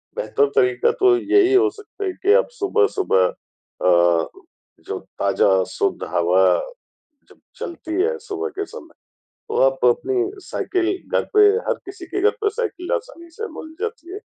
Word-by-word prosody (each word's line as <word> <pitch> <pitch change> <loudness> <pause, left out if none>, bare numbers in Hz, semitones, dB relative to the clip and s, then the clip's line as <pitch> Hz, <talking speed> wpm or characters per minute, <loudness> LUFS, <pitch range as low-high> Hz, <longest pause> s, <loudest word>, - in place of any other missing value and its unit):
बेहतर 485 -3 +1
तरीक़ा 405 +2 +3
तो 380 -1 +5
यही 385 +2 +3
हो 410 +2 +5
सकता 415 0 -9
है 375 - -1
कि 405 +4 +2
आप - - -11
सुबह-सुबह 395 - +2
अ, 85 -2 0 0.6
जो - - -3 0.2
ताज़ा 95 -1 +3
शुद्ध - - -1
हवा 90 +2 +3 0.9
जब - - -20 0.2
चलती 330 -1 -6
है 465 +3 0
सुबह 425 0 -4
के 405 - -2
समय, - - -12 0.6
तो 445 - -3
आप - - -6
अपनी 390 -5 +1 0.2
साइकिल 365 -1 -1 0.3
घर - - -1
पे 425 - +6 0.3
हर - - +2
किसी 375 -3 -9
के 390 +3 -3
घर 435 - +5
पे 415 - +2
साइकिल 425 -3 -4
आसानी 460 -9 -7
से 440 +7 -6
मिल 315 0 -9
जाती 445 -5 -5
है, 405 - -6
390 Hz, 160 wpm, -21 LUFS, 335-435 Hz, 0.9 s, पे